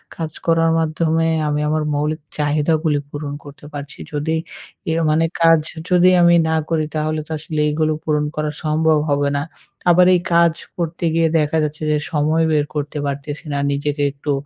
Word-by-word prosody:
কাজ 160 -2 -4
করার 165 -1 +3
মাধ্যমে 160 0 +1 0.2
আমি 150 0 0
আমার 155 0 0
মৌলিক 150 +2 -1 0.2
চাহিদাগুলি 150 +1 +1
পূরণ 145 -1 -5
করতে 145 0 -13
পারছি। 145 -1 -8
যদি 150 +2 -1 0.6
এর 165 - +1
মানে 160 +2 +3 0.2
কাজ 165 -1 +6 0.3
যদি 180 0 +5
আমি 170 0 +6
না 160 - +1
করি 160 -2 +1
তাহলে 155 0 -1
তো - - -11
আসলে 155 0 -5
এইগুলো 155 +1 +1
পূরণ 150 -1 0
করা 155 0 -1
সম্ভব 155 0 +2
হবে 145 0 +1
না। - - -1 0.5
আবার 180 +1 +6
এই - - +2
কাজ 170 -1 +5 0.2
করতে 170 0 -3
গিয়ে 165 0 +3
দেখা 150 +1 0
যাচ্ছে 155 +1 -4
যে, 150 - +2
সময় 155 +2 +2
বের 150 -1 +2
করতে 145 0 -3
পারতেছি 140 +2 -5
না - - -1
নিজেকে 145 +1 -1
একটু 145 +1 -4
155 Hz, 175 wpm, -19 LUFS, 150-165 Hz, 0.6 s, কাজ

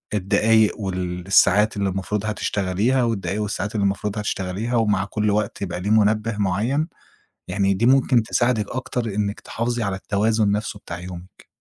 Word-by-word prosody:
الدقايق 105 +3 +3
والساعات 95 +3 +2
اللي 100 -1 0
المفروض 95 +2 -3
هتشتغليها 105 +4 0
والدقايق 105 -2 -1
والساعات 105 +1 -3
اللي 100 - +1
المفروض 100 +2 -1
هتشتغليها 105 +3 -2
ومع 105 -4 +2
كل 105 0 -1
وقت 105 -1 -1
يبقى 90 -1 -4
ليه 100 - -2
منبه 110 0 +2
معيّن، 110 - 0 0.6
يعني 100 +1 +1
دي 115 +5 +1
ممكن 130 -2 +4
تساعدِك 120 -3 0
أكتر 130 -2 -3
إنِّك 100 0 -2
تحافظي 120 0 -3
على 100 -1 -1
التوازن 105 +1 +1
نفسه 105 0 -3
بتاع 85 +1 -7
يومِك. 90 0 -10
105 Hz, 150 wpm, -22 LUFS, 95-110 Hz, 0.6 s, ممكن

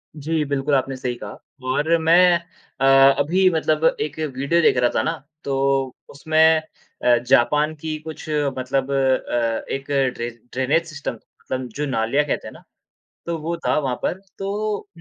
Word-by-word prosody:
जी, 155 +1 -1
बिल्कुल, 140 +1 -1
आपने 135 0 0
सही 125 -1 -3
कहा - - -9 0.3
और 160 +5 +2
मैं 175 +1 +6 0.4
अ, - - +3 0.3
अभी 185 +6 +3
मतलब 155 -1 +1 0.2
एक 150 0 -3
वीडियो 145 +3 0
देख 130 - +4
रहा 125 -1 +3
था - - +3
ना, 165 - 0 0.3
तो 135 -1 0 0.2
उसमें 160 +2 +3 0.5
अ, 120 -1 +5
जापान 150 +6 +3
की 155 0 -5
कुछ 160 0 -9 0.3
मतलब 130 +1 -1
अ, 130 -4 0
एक 135 0 -4 0.3
ड्रे 120 +1 -3 0.2
ड्रेनेज 140 +6 +1
सिस्टम 150 -4 -5
मतलब 130 +2 -7
जो 150 +1 -2
नालियाँ 130 +3 0
कहते 150 - -3
हैं - - -8
ना, - - -15 0.6
तो 170 -1 -2
वो 165 +2 -3
था - - +2
वहाँ 130 -4 -1
पर, 185 - -1 0.2
तो 205 +1 -3
145 Hz, 160 wpm, -22 LUFS, 130-160 Hz, 0.6 s, मैं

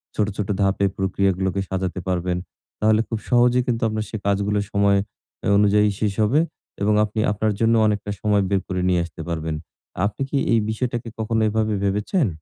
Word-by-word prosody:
ছোট, 105 - +1
ছোট 105 - -2
ধাপে 100 0 +2
প্রক্রিয়াগুলোকে 95 0 0
সাজাতে 95 -1 -2
পারবেন। 90 -1 0 0.4
তাহলে 110 0 +4
খুব 115 - -3
সহজেই 125 +1 +4
কিন্তু 115 -2 0
আপনার 110 0 -2
সে 110 - -4
কাজগুলো 100 +1 +1
সময় 100 -1 +3 0.4
অ্যা - - -1
অনুযায়ী 105 0 +4
শেষ 105 -2 0
হবে 125 +8 +3 0.4
এবং 105 +1 +3
আপনি 105 +1 -3
আপনার 105 0 0
জন্য 115 0 +3
অনেকটা 105 -1 -1
সময় 105 -2 +2
বের 100 -1 +1
করে 90 -1 -2
নিয়ে 90 -1 +2
আসতে 85 0 -10
পারবেন। 80 -1 -2 0.5
আপনি 105 +5 -3
কি 140 - 0 0.2
এই 115 - +5
বিষয়টাকে 120 +1 -2
কখনো 110 0 0
এভাবে 110 0 0
ভেবেছেন? 105 - +1
105 Hz, 175 wpm, -22 LUFS, 95-110 Hz, 0.5 s, এই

